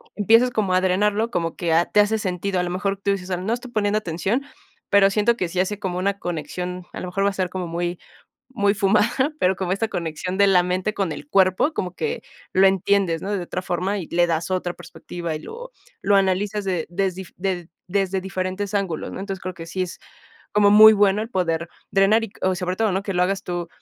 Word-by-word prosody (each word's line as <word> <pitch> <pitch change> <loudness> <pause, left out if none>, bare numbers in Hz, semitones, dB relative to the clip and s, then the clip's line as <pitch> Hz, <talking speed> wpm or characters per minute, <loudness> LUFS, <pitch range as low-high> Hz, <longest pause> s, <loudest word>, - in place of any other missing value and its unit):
empiezas 230 +4 +4
como 205 -6 0
a 185 - +4
drenarlo, 210 +5 +1
como 165 -4 -2
que, 170 -2 0
ah, 170 +2 +4
te 210 - +1
hace 210 +2 +4
sentido. 185 -1 -2
A - - -1
lo 175 - -3
mejor 195 +2 -1
tú 200 - +2
dices: 190 -2 -3
"Ah, 185 - 0
no 190 +5 -3
estoy 245 +1 -6
poniendo 210 -2 +1
atención, 190 +7 -1 0.5
pero, 195 -1 +5
siento 210 +4 +2
que 180 -7 -2
si 180 - -3
hace 190 +3 0
como 185 -3 -3
una 200 +1 0
conexión", 180 +2 -4
a - - -6
lo 180 - -5
mejor 195 +2 -1
va - - +4
a - - -5
ser 185 -2 -1
como 185 -2 -4
muy 175 +1 -3 0.5
muy 200 -5 +1
fumada, 230 +8 +2
pero, 185 -3 +3
como 185 -2 -2
esta 220 +3 -1
conexión 175 +1 -3
de 200 - +5
la 180 -2 +5
mente 185 +4 -1
con 195 -5 -1
el - - -7
cuerpo, 190 - +3
como 180 - -3
que 155 -3 -3 0.3
lo 190 +1 +6
entiendes, 190 -3 +1
¿no? 200 - -4
De 185 - -3
otra 180 +1 -4
forma, 185 +3 -1
y 175 -5 -5
le 175 0 +2
das 165 +1 -1
otra 180 -1 -1
perspectiva, 170 -3 -7
y - - -5
lo 485 - -9 0.3
lo 205 - +3
analizas 195 +2 +1
de 180 -4 -1
desdi 190 +1 -2
de 180 -2 -2 0.2
desde 195 0 0
diferentes 190 +2 -3
ángulos, 195 -6 -2
¿no? - - -6
Entonces, 195 -1 -5
creo 185 0 -5
que 165 -1 -9
sí 185 +3 -4
es 180 - -8 0.5
como 205 -1 +5
muy 215 +1 +9
bueno, 205 0 +3
el 225 - -6
poder 170 -4 -1 0.2
drenar 205 +4 +4
y, 200 - -9
o 185 0 +2
sobre 180 0 -3
todo, 220 0 +1
¿no? 190 +2 -1
Que 200 -1 -3
lo 180 - +3
hagas 195 +2 0
tú, 175 -2 -4
190 Hz, 230 wpm, -23 LUFS, 180-205 Hz, 0.5 s, muy